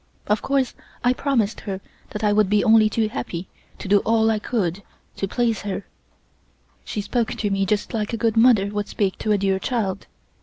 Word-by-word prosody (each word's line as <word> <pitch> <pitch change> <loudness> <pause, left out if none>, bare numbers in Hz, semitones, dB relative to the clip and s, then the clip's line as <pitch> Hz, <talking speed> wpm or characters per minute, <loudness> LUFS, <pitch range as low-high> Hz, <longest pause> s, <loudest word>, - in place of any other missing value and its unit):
Of 210 +1 +1
course 270 -2 0 0.3
I 245 0 +4
promised 250 -6 0
her 195 -3 -5 0.3
that 210 - -6
I 210 -1 +3
would 210 -2 +3
be 210 0 +3
only 220 -2 +5
too 220 0 0
happy 190 -6 -5 0.3
to - - -7
do 200 +1 +5
all 225 +1 +2
I 215 - 0
could 200 -5 -2 0.4
to 195 - -1
please 230 0 0
her. 200 0 -4 1.0
She 210 - -4
spoke 235 +2 -1
to 205 -2 -2
me 195 0 +1
just 210 +4 -1
like 215 -2 -1
a 230 - -2
good 225 0 +1
mother 225 -4 +5
would 205 0 -3
speak 195 -3 -1
to 215 - -1
a 210 - +4
dear 195 -1 +1
child. 200 -5 -2
210 Hz, 200 wpm, -23 LUFS, 200-230 Hz, 1.0 s, only